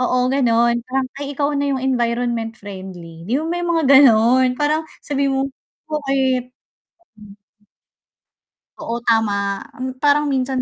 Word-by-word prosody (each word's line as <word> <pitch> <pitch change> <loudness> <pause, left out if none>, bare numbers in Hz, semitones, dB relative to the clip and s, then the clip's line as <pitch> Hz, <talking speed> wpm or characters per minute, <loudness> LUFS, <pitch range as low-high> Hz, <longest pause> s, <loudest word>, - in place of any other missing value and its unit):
oo, 250 0 +1
ganon 235 -3 +2
parang, 265 0 -1
"Ay 285 -1 -5
ikaw 285 +1 0
na 285 0 -1
'yong 265 -2 -2
environment 235 -3 -1
friendly." 185 -4 -10
'Di 240 - 0
mo 305 - -2
may 350 - -2
mga 340 -2 0
gano'n 250 -1 +5
parang 300 +2 +1 0.2
sabihin 280 -1 0
mo. - - +1 0.5
Bakit? 265 -4 -1 2.2
Oo 235 +1 -4
tama, 200 -3 +1 0.2
mm, 260 0 -4
parang 290 0 +3
minsan 260 -1 -1
255 Hz, 130 wpm, -19 LUFS, 230-280 Hz, 2.2 s, gano'n